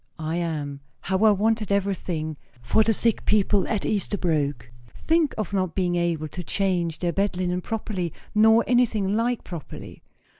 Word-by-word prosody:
"I 160 +1 -3
am. 150 -5 -3 0.2
How 190 0 -1
I - - +8
wanted 215 +1 +1
everything 180 -6 -1 0.3
for 120 - +3
the 220 +1 +3
sick 225 +1 +1
people 205 -1 +2
at 210 -4 -1
Esterbrooke. 160 - -1 0.2
Think 320 -2 +1
of 215 -2 -3
not 185 -4 -1
being 180 -2 +1
able 170 -3 0
to 180 +4 -6
change 175 0 0
their 175 -1 -1
bed 195 0 0
linen 180 0 -1
properly, 195 -5 -3 0.2
nor 220 +2 +5
anything 220 -5 +2
like 235 +2 0
properly!" 170 -5 -9
190 Hz, 155 wpm, -25 LUFS, 170-215 Hz, 0.3 s, I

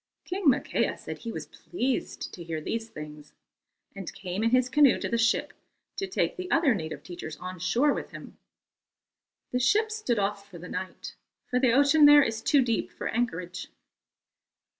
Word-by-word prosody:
King 370 -1 -2
Makea 265 - +2
said - - -8
he 230 - -5
was - - -6
pleased 265 -6 -3
to 175 - -8
hear 165 -1 -4
these 225 +8 -4
things, 150 -4 -10 0.6
and 195 -3 -6
came 185 +2 -4
in 230 - +3
his 255 +1 +3
canoe 275 +1 +5
to - - -2
the 235 - -1
ship 230 +1 +1 0.4
to 390 - -2
take 380 - -1
the 365 0 -5
other 320 -6 +4
native 160 -7 -5
teachers 160 -3 -8
on 185 +2 -7
shore 240 - +2
with - - -5
him. - - -11 1.1
The 250 - 0
ship 430 - +2
stood 430 - -1
off 200 0 -2
for 180 - -11
the 175 +2 -9
night, 185 0 -6 0.4
for 250 - +2
the 255 -3 +3
ocean 285 +3 +6
there 290 0 +8
is 225 -2 -2
too 275 +3 +4
deep 230 -2 -1
for - - -5
anchorage. 185 -6 -3
230 Hz, 180 wpm, -27 LUFS, 185-280 Hz, 1.1 s, there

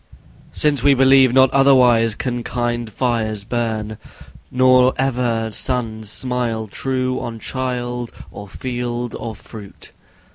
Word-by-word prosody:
Since 150 -2 0
we 140 -1 +4
believe 135 -1 +5
not 130 0 +4
otherwise 125 -5 +4
can 120 0 -3
kind 120 -1 -3
fires 110 -5 -1
burn; 110 -2 -3 0.5
Nor 130 0 +4
ever 120 -4 -1
suns 110 -5 -2
smile 115 0 -1
true 130 +4 -2
on 115 -1 -6
child, 125 -1 -4 0.2
or 100 - -9
field, 120 +1 -4
or 110 -1 -6
fruit. 105 -1 -12
120 Hz, 115 wpm, -19 LUFS, 115-130 Hz, 0.5 s, believe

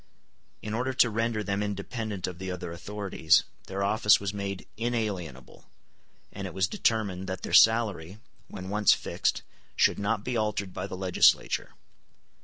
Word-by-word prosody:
In 105 - -4
order 125 +3 -1
to 125 -3 +4
render 115 0 -1
them 100 0 -1
independent 105 0 -4
of 90 -1 -6
the 95 0 -5
other 90 -2 -5
authorities, 90 -1 +1 0.2
their 95 +1 -3
office 105 +1 +4
was 100 0 -3
made 100 -1 -5
inalienable; 105 - -4 0.6
and - - -5
it - - -10
was 95 -1 +2
determined 95 -4 -1
that 95 -1 -5
their - - -5
salary, 105 -6 +4 0.3
when 95 0 -8
once 105 +1 +4
fixed, - - -2 0.3
should - - +3
not 100 +1 -1
be 125 +1 -3
altered 105 -4 -1
by - - -4
the 95 - -7
legislature. 95 -1 +2
100 Hz, 155 wpm, -28 LUFS, 95-110 Hz, 0.6 s, to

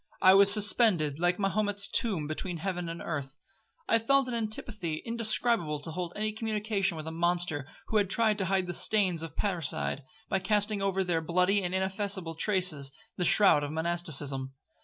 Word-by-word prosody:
I 185 - +6
was 200 +1 +6
suspended 200 - +3
like 175 +1 +1
Mahomet's 205 0 +1
tomb 195 -10 -1
between 170 +4 -4
heaven 180 0 -4
and 165 0 -7
earth. 145 -3 -5 0.5
I 230 - +5
felt 275 +3 +3
an 250 - -4
antipathy 215 -7 -3
indescribable 230 -8 +1
to 155 +3 -7
hold 175 +1 -5
any 215 +1 -1
communication 210 -4 -2
with 155 - -7
a 160 - -5
monster 170 -4 -1 0.2
who 220 - +1
had 200 -3 +1
tried 220 0 +2
to 190 - 0
hide 190 -1 0
the 175 - -5
stains 185 -4 +1
of 165 -2 -7
parricide, 170 -7 -2 0.3
by 195 - 0
casting 205 +1 0
over 195 -1 0
their 175 -3 -1
bloody 180 +5 +1
and 180 0 -2
ineffaceable 190 -2 -3
traces 170 -6 0 0.3
the 180 - 0
shroud 190 -8 +4
of 145 - -4
monasticism. 150 -5 -1
185 Hz, 175 wpm, -29 LUFS, 165-210 Hz, 0.5 s, I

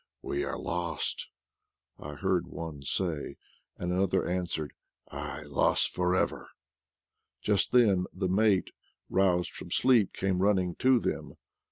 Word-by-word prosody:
"We - - -2
are - - -3
lost," 85 -1 -2 0.7
I 75 0 -7
heard - - 0
one 80 -4 -7
say; 80 +2 -2 0.4
and 90 0 -2
another 95 0 +1
answer, 85 -4 -2 0.4
"Aye, 75 - -5
lost 70 -2 +2
for 90 0 +1
everl" - - -1 0.9
Just 105 -2 +1
then 100 -7 +4
the 95 0 -2
mate, 95 0 +2 0.4
roused 90 -2 +2
from 90 - -9
sleep, 120 0 +4
came 95 -1 -1
run 100 +1 +4
ning 90 -2 -1
to 130 0 +5
them. - - -3
90 Hz, 135 wpm, -29 LUFS, 85-95 Hz, 0.9 s, to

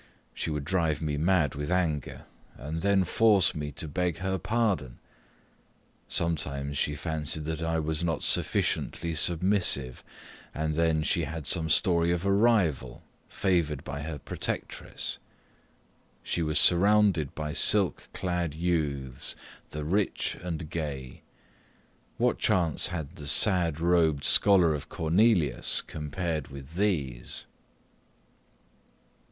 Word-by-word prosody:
She - - -3
would 75 -2 -3
drive 80 -4 0
me 75 -2 -2
mad 80 -3 +2
with 75 +2 -5
anger, 80 -6 -1 0.3
and 80 +4 -5
then 100 0 +3
force 105 -1 +3
me 75 -1 -5
to 80 - -3
beg 85 +3 -1
her 95 +2 -2
pardon. 100 - -1 1.1
Sometimes 70 -4 -2
she 75 +1 0
fancied 80 -1 -2
that 80 +1 -3
I 80 0 0
was 80 0 -1
not 85 -2 -1
sufficiently 85 0 0
submissive, 85 -6 +1 0.5
and 80 0 -1
then 80 -1 +1
she 85 +1 +1
had 80 0 -6
some 80 0 -1
story 85 0 +3
of 90 +1 -1
a 100 - +3
rival, 100 - +1 0.3
favoured 85 -8 0
by 70 +1 -6
her 75 0 -5
protectress. - - -4 1.0
She 85 - -1
was 75 -1 0
surrounded 95 -4 +4
by 75 -1 -4
silk 100 +2 +3
clad 90 -4 -2
youths 75 -7 -1 0.3
the 75 0 -5
rich 95 +6 0
and 85 -2 -5
gay 70 -6 -5 1.0
What - - +1
chance 85 -4 +2
had 80 -1 -6
the 75 -3 -8
sad 85 -2 +3
robed 80 -4 +2
scholar 90 -5 +4
of 75 - -6
Cornelius 85 - +2
compared 80 0 -4
with 70 +2 -10
these? 80 -11 -1
80 Hz, 125 wpm, -28 LUFS, 75-90 Hz, 1.1 s, surrounded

